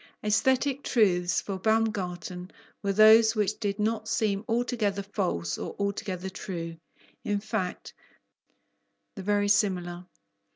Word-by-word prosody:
Aesthetic 260 Hz, +6 st, +2 dB
truths 180 Hz, -9 st, +2 dB
for 195 Hz, -2 st, -5 dB
Baumgarten 185 Hz, -4 st, -1 dB, 0.3 s
were 200 Hz, -, 0 dB
those 220 Hz, +2 st, +7 dB
which 210 Hz, 0 st, 0 dB
did 200 Hz, -2 st, -2 dB
not 220 Hz, 0 st, -1 dB
seem 210 Hz, -3 st, 0 dB
altogether 225 Hz, -4 st, 0 dB
false 180 Hz, -, -2 dB
or -, -, -5 dB
altogether 195 Hz, -2 st, -3 dB
true: 170 Hz, -3 st, -6 dB, 0.5 s
in 205 Hz, -1 st, 0 dB
fact, 200 Hz, -3 st, -4 dB, 1.2 s
the -, -, -6 dB
verisimilar. 190 Hz, -3 st, +1 dB
205 Hz, 110 wpm, -28 LUFS, 185-220 Hz, 1.2 s, those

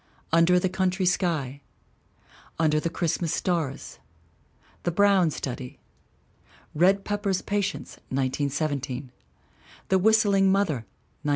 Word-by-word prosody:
Under 165 Hz, +2 st, +5 dB
the 185 Hz, -, 0 dB
Country 185 Hz, 0 st, 0 dB
Sky. 155 Hz, -7 st, 0 dB, 1.0 s
Under 155 Hz, -1 st, +2 dB
the 170 Hz, -, -2 dB
Christmas 165 Hz, 0 st, -1 dB
Stars. 165 Hz, -7 st, -2 dB, 0.8 s
The -, -, -1 dB
Brown 195 Hz, -1 st, +4 dB
Study. 130 Hz, -2 st, -6 dB, 1.0 s
Red 195 Hz, +5 st, +3 dB
Pepper's 205 Hz, -2 st, -1 dB
Patients, 200 Hz, -1 st, -3 dB
1917. 135 Hz, 0 st, -2 dB, 0.8 s
The 190 Hz, -, +4 dB
Whistling 200 Hz, -2 st, +4 dB
Mother, 160 Hz, -, 0 dB, 0.3 s
1917. 150 Hz, -, -3 dB
170 Hz, 100 wpm, -26 LUFS, 145-195 Hz, 1.0 s, Under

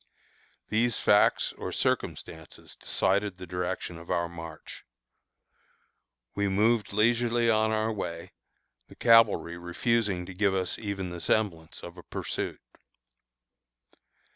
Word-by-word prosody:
These 115 Hz, +2 st, +2 dB
facts 105 Hz, -, +3 dB
or -, -, -6 dB
circumstances 80 Hz, -1 st, -3 dB
decided 100 Hz, 0 st, 0 dB
the 90 Hz, -, -8 dB
direction 90 Hz, -1 st, -4 dB
of 85 Hz, -, -13 dB
our 85 Hz, 0 st, +1 dB
march. 80 Hz, -2 st, -10 dB, 1.5 s
We 100 Hz, 0 st, 0 dB
moved 105 Hz, +3 st, +2 dB
leisurely 120 Hz, +2 st, +2 dB
on 110 Hz, 0 st, +3 dB
our 110 Hz, 0 st, 0 dB
way, 85 Hz, -5 st, -5 dB, 0.6 s
the -, -, -15 dB
cavalry 115 Hz, -7 st, +4 dB
refusing 95 Hz, +1 st, 0 dB
to 95 Hz, -, -8 dB
give 100 Hz, +1 st, +1 dB
us 95 Hz, -1 st, -1 dB
even 100 Hz, -4 st, -4 dB
the 90 Hz, -, -6 dB
semblance 85 Hz, -5 st, -1 dB
of 85 Hz, +1 st, -9 dB
a -, -, -9 dB
pursuit. -, -, -4 dB
100 Hz, 115 wpm, -28 LUFS, 85-110 Hz, 1.5 s, cavalry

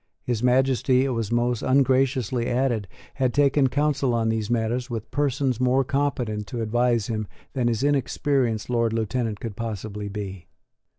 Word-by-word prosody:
His 120 Hz, -3 st, -1 dB
Majesty, 130 Hz, +1 st, +3 dB
it -, -, 0 dB
was 115 Hz, -4 st, -2 dB
most 120 Hz, 0 st, +1 dB
ungraciously 130 Hz, -2 st, +2 dB
added, 120 Hz, -5 st, 0 dB, 0.3 s
had 130 Hz, -3 st, 0 dB
taken 140 Hz, -1 st, +4 dB
counsel 140 Hz, -3 st, +1 dB
on 115 Hz, -1 st, +1 dB
these 110 Hz, -1 st, -1 dB
matters 120 Hz, +2 st, -1 dB
with 115 Hz, -2 st, -5 dB
persons 140 Hz, -3 st, 0 dB
more 130 Hz, +1 st, +3 dB
competent 125 Hz, -6 st, -1 dB
to 120 Hz, -3 st, -3 dB
advise 120 Hz, 0 st, +1 dB
him 110 Hz, -2 st, -3 dB, 0.3 s
than 125 Hz, -4 st, 0 dB
his 115 Hz, +1 st, 0 dB
inexperienced 135 Hz, -4 st, +1 dB
Lord 115 Hz, -2 st, +1 dB
Lieutenant 115 Hz, -1 st, -1 dB
could 115 Hz, -4 st, -6 dB
possibly 105 Hz, -2 st, -5 dB
be. 100 Hz, -3 st, -6 dB
120 Hz, 155 wpm, -24 LUFS, 110-130 Hz, 0.3 s, taken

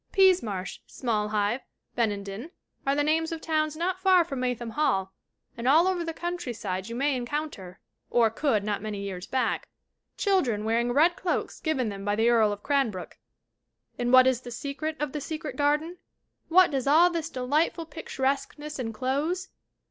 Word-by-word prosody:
Peasemarsh, 345 Hz, -, +2 dB
Smallhive, 210 Hz, 0 st, -1 dB, 0.3 s
Benenden 205 Hz, +2 st, -2 dB, 0.4 s
are 275 Hz, -, +3 dB
the 290 Hz, -, +2 dB
names 320 Hz, +2 st, +1 dB
of 330 Hz, -, -3 dB
towns 310 Hz, -1 st, 0 dB
not 360 Hz, +3 st, -1 dB
far 375 Hz, -2 st, +5 dB
from 275 Hz, -5 st, -5 dB
Maytham 245 Hz, -2 st, -2 dB
Hall 195 Hz, -9 st, 0 dB, 0.4 s
and 235 Hz, +1 st, -4 dB
all 320 Hz, +7 st, +6 dB
over 365 Hz, -2 st, 0 dB
the 330 Hz, -, -3 dB
countryside 240 Hz, -, -4 dB
you 230 Hz, -, -5 dB
may 275 Hz, +2 st, +1 dB
encounter, 245 Hz, -8 st, -4 dB, 0.3 s
or 230 Hz, -2 st, +3 dB
could 225 Hz, -4 st, +1 dB
not 205 Hz, -1 st, -2 dB
many 210 Hz, -1 st, -4 dB
years 185 Hz, -2 st, -5 dB
back, 260 Hz, -1 st, -1 dB, 0.5 s
children 265 Hz, -, +1 dB
wearing 235 Hz, +2 st, +1 dB
red 320 Hz, +7 st, +4 dB
cloaks 360 Hz, -, -2 dB
given 265 Hz, -8 st, 0 dB
them 195 Hz, -1 st, -6 dB
by 205 Hz, 0 st, 0 dB
the 225 Hz, +2 st, +3 dB
Earl 220 Hz, -3 st, +4 dB
of 205 Hz, 0 st, -6 dB
Cranbrook. 265 Hz, -11 st, -1 dB, 0.8 s
And 245 Hz, 0 st, 0 dB
what 255 Hz, 0 st, +8 dB
is 260 Hz, -2 st, +2 dB
the 245 Hz, -, -9 dB
secret 285 Hz, +5 st, -4 dB
of 300 Hz, -2 st, -2 dB
The 300 Hz, -, -4 dB
Secret 305 Hz, -2 st, -5 dB
Garden? 300 Hz, +5 st, 0 dB, 0.5 s
What 365 Hz, +1 st, +6 dB
does 270 Hz, -2 st, -1 dB
all 330 Hz, +5 st, +6 dB
this 330 Hz, -1 st, -3 dB
delightful 300 Hz, +6 st, 0 dB
picturesqueness 295 Hz, -1 st, -3 dB
enclose? 270 Hz, -, -2 dB
265 Hz, 165 wpm, -27 LUFS, 225-315 Hz, 0.8 s, what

